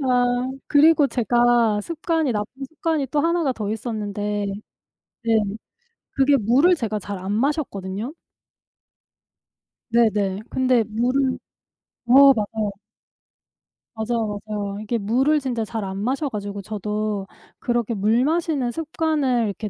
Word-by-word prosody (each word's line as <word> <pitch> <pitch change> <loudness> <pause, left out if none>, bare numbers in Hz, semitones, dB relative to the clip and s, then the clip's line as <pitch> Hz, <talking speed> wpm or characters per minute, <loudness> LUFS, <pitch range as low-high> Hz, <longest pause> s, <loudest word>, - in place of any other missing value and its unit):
아 250 -1 +1 0.2
그리고 300 0 +5
제가 240 -3 +2
습관이 320 +1 -1
나쁜 225 +6 -4
습관이 320 -4 -1
또 290 +4 +1
1 335 +2 +1
가 270 - +1
더 210 -4 -4
있었는데, 210 -2 -3 0.8
네 230 - 0 0.8
그게 275 +1 +4
물을 265 - +4
제가 215 -8 -2
잘 200 0 -6
안 190 +2 -4
마셨거든요. 225 - -2 1.8
네네. 210 -4 +2
근데 255 -3 +2
물을 255 +4 0 0.7
어 275 +3 +8
맞아요. 215 -2 -2 1.3
맞아요, 220 -2 -2
맞아요. 205 -2 -4
이게 225 +2 -2
물을 260 +9 +2
진짜 250 -5 -2
잘 220 0 -4
안 190 0 -5
마셔 265 +7 -1
가지고 205 -3 -5
저도 210 -1 -3 0.3
그렇게 240 -1 -1
물 220 +4 +2
마시는 310 -6 0
습관을 300 -5 0
이렇게 210 +1 -4
235 Hz, 240 characters per minute, -22 LUFS, 210-275 Hz, 1.8 s, 어